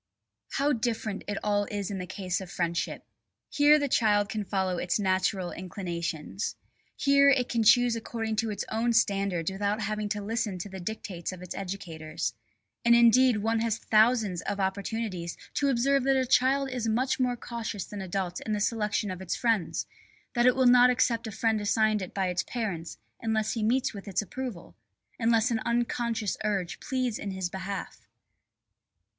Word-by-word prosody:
How 285 Hz, +1 st, +2 dB
different 225 Hz, -3 st, -2 dB
it 205 Hz, -1 st, -2 dB
all 205 Hz, -1 st, +1 dB
is 205 Hz, -1 st, -4 dB
in 195 Hz, -, -3 dB
the 180 Hz, -, -5 dB
case 185 Hz, -1 st, -3 dB
of 185 Hz, -, -8 dB
friendship. 170 Hz, -2 st, -2 dB, 0.5 s
Here 295 Hz, +1 st, +6 dB
the 290 Hz, -1 st, 0 dB
child 205 Hz, -5 st, +2 dB
can 210 Hz, +1 st, -2 dB
follow 190 Hz, -3 st, -1 dB
its 180 Hz, +3 st, 0 dB
natural 190 Hz, -1 st, 0 dB
inclinations. 175 Hz, 0 st, -4 dB, 0.4 s
Here 280 Hz, 0 st, +5 dB
it 255 Hz, -3 st, +2 dB
can 235 Hz, -, +1 dB
choose 240 Hz, +2 st, +5 dB
according 225 Hz, -1 st, -3 dB
to 225 Hz, +1 st, 0 dB
its 205 Hz, -2 st, -3 dB
own 235 Hz, +2 st, +1 dB
standards 195 Hz, -5 st, +1 dB
without 205 Hz, +2 st, -1 dB
having 210 Hz, 0 st, -2 dB
to 205 Hz, -1 st, -2 dB
listen 215 Hz, -2 st, -2 dB
to 180 Hz, +3 st, -6 dB
the 190 Hz, 0 st, -7 dB
dictates 180 Hz, -3 st, -5 dB
of 180 Hz, -1 st, -9 dB
its 180 Hz, -, -6 dB
educators. 160 Hz, -, -4 dB, 0.5 s
And 235 Hz, 0 st, +6 dB
indeed 235 Hz, -1 st, +5 dB
one 225 Hz, 0 st, +1 dB
has 225 Hz, -1 st, 0 dB
thousands 215 Hz, -5 st, +3 dB
of 205 Hz, 0 st, -3 dB
opportunities 195 Hz, -2 st, -2 dB, 0.2 s
to 280 Hz, -, +1 dB
observe 270 Hz, +2 st, +2 dB
that 270 Hz, 0 st, +4 dB
a 260 Hz, -, +2 dB
child 270 Hz, +2 st, +3 dB
is 245 Hz, -3 st, -2 dB
much 255 Hz, +5 st, +1 dB
more 250 Hz, -1 st, +1 dB
cautious 225 Hz, -5 st, -5 dB
than 205 Hz, -1 st, -7 dB
adults 185 Hz, -1 st, -3 dB
in 215 Hz, -, -3 dB
the 210 Hz, -, 0 dB
selection 210 Hz, -1 st, 0 dB
of 185 Hz, 0 st, -6 dB
its 190 Hz, -, -2 dB
friends, 225 Hz, -8 st, 0 dB, 0.5 s
that 240 Hz, 0 st, +3 dB
it 250 Hz, -, +5 dB
will 260 Hz, -1 st, +3 dB
not 245 Hz, 0 st, +7 dB
accept 240 Hz, -2 st, +1 dB
a -, -, -5 dB
friend 220 Hz, 0 st, 0 dB
assigned 215 Hz, 0 st, +2 dB
it 185 Hz, -, -5 dB
by 190 Hz, -2 st, -1 dB
its 180 Hz, 0 st, 0 dB
parents 195 Hz, -9 st, -4 dB, 0.2 s
unless 220 Hz, -1 st, 0 dB
he 230 Hz, -, -2 dB
meets 245 Hz, +4 st, +1 dB
with 200 Hz, 0 st, -9 dB
its 195 Hz, +1 st, 0 dB
approval, 245 Hz, -5 st, -7 dB, 0.4 s
unless 230 Hz, +1 st, +3 dB
an 225 Hz, -, +1 dB
unconscious 235 Hz, -2 st, -1 dB
urge 195 Hz, -5 st, -1 dB
pleads 255 Hz, -4 st, -2 dB
in 200 Hz, -, -4 dB
his 190 Hz, -2 st, -3 dB
behalf. 190 Hz, +1 st, -6 dB
215 Hz, 180 wpm, -28 LUFS, 190-235 Hz, 0.5 s, not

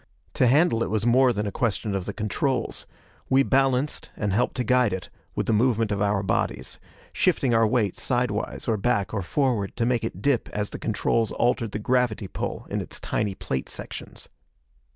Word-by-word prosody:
To 125 Hz, -, +3 dB
handle 135 Hz, -2 st, +4 dB
it -, -, 0 dB
was 110 Hz, 0 st, 0 dB
more 125 Hz, +2 st, +5 dB
than 105 Hz, -2 st, -2 dB
a 100 Hz, -, -2 dB
question 110 Hz, -2 st, -1 dB
of 95 Hz, -2 st, -2 dB
the -, -, -1 dB
controls. 115 Hz, +3 st, -2 dB, 0.4 s
We 135 Hz, +1 st, +5 dB
balanced, 135 Hz, +1 st, +1 dB
and 105 Hz, -3 st, -1 dB
helped 115 Hz, +5 st, +1 dB
to 125 Hz, -, 0 dB
guide 125 Hz, -3 st, +3 dB
it, 95 Hz, -1 st, -5 dB, 0.2 s
with -, -, -1 dB
the 115 Hz, -, +1 dB
movement 115 Hz, -1 st, +2 dB
of 100 Hz, -1 st, -1 dB
our 100 Hz, -1 st, +1 dB
bodies 115 Hz, +3 st, -2 dB, 0.3 s
shifting 125 Hz, -3 st, +2 dB
our 115 Hz, -1 st, +4 dB
weight 105 Hz, -4 st, +1 dB
sidewise, 120 Hz, -4 st, -1 dB
or 110 Hz, -2 st, +2 dB
back, 100 Hz, -2 st, 0 dB
or 100 Hz, -, -1 dB
forward 110 Hz, -, 0 dB
to 115 Hz, -, +1 dB
make 120 Hz, -1 st, +1 dB
it 90 Hz, -, -4 dB
dip 135 Hz, +2 st, +1 dB
as 105 Hz, 0 st, -2 dB
the -, -, -6 dB
controls 115 Hz, -2 st, 0 dB
altered 120 Hz, -2 st, +1 dB
the -, -, -3 dB
gravity 115 Hz, -2 st, 0 dB
pull -, -, -4 dB
in -, -, -1 dB
its -, -, -6 dB
tiny 105 Hz, -3 st, -2 dB
plate 65 Hz, -, -3 dB
sections. -, -, -8 dB
115 Hz, 195 wpm, -25 LUFS, 105-125 Hz, 0.4 s, more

